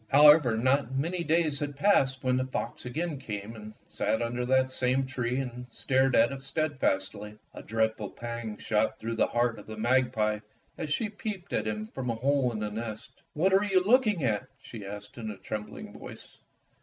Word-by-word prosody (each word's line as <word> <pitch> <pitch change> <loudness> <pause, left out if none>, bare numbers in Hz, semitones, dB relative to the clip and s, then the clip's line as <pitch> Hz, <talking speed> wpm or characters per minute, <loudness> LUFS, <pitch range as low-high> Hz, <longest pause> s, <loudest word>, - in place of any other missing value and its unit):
However, 145 -2 +7
not 130 +2 +1
many 170 +5 -1
days 160 -3 +2
had 145 -1 -3
passed 135 -6 +3
when 130 -1 +2
the 130 0 0
fox 125 -1 -4
again 155 +3 -3
came 105 -3 -6
and 110 -1 -9
sat 110 +1 -1
under 120 +1 -2
that 130 0 +3
same 130 +1 +2
tree 125 -1 -2
and 125 -2 -4
stared 130 +2 +2
at 115 +3 +5
it 135 -1 -6
steadfastly. 105 -8 -1 0.2
A - - -8
dreadful 110 -2 -1
pang 115 -2 -6
shot 110 0 0
through 115 +1 -4
the - - +3
heart 120 -2 0
of 105 - -13
the 110 0 -7
magpie 115 -2 +2 0.4
as 160 - -4
she 220 +8 +1
peeped 205 -3 -6
at - - 0
him 105 0 -2
from 125 +3 -5
a 115 - 0
hole 135 +1 +2
in 110 - -4
the 105 0 -3
nest. 110 0 -6
" - - -46
What 185 +5 +3
are 195 +1 +5
you 190 -3 +3
looking 215 - +3
at? 115 +1 0
" - - -40
she 110 -4 -8
asked 105 +3 -8
in 110 -2 -4
a 105 - -6
trembling 105 +3 -6
voice. - - -11
125 Hz, 200 wpm, -29 LUFS, 110-140 Hz, 0.4 s, However